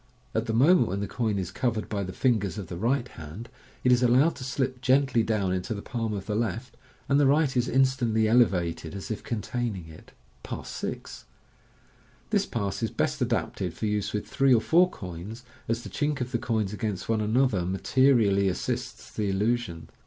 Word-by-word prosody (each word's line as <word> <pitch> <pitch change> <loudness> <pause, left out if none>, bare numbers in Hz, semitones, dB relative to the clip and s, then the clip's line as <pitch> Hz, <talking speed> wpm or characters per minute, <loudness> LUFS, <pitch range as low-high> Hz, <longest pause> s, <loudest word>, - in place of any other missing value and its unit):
At - - -1
the 110 - -1
moment 155 +11 +5
when 95 +2 -2
the 100 - -2
coin 110 -4 -1
is 90 -2 -3
covered 115 -2 -1
by 105 -2 -2
the 95 -1 -4
fingers 105 -5 0
of 95 -5 -6
the 85 - -5
right 120 +7 0
hand, 80 +8 -9 0.3
it 125 - +4
is 125 0 +5
allowed 130 +7 +4
to 135 - -7
slip 130 0 -2
gently 130 -1 +3
dowr: 105 -4 0
into 95 +5 -3
the 100 - -7
palm 115 -3 -3
of 100 -2 -4
the 105 - -2
left, 115 +2 -2 0.3
and 140 +1 +3
the 145 - +5
right 145 -1 +3
is 125 0 +1
instantly 125 -4 +2
elevated 90 -8 +2
as 100 +3 -6
if 110 - -3
containing 115 -5 -3
it. 80 - -14 0.3
Pass - - -6
6. - - -6 0.5
— - - -32
This - - +2
pass 100 -2 -3
is 115 - 0
best - - -1
adapted 90 -3 -1
for - - -3
use 105 -1 -1
with 105 - -3
three 135 -2 +4
or - - +4
four 180 +7 +4
coins, 95 - -8 0.2
as 115 +1 -1
the - - -7
chink 145 -1 -1
of 125 0 -3
the 120 - 0
coins 110 -4 -1
against 105 -3 -3
one 110 -1 +1
another 110 -3 +2
ma* 95 +2 -2
terially 110 -7 +3
assists 90 - -4
the 105 -2 -2
illusion. 100 -3 -1
110 Hz, 200 wpm, -27 LUFS, 100-125 Hz, 0.5 s, moment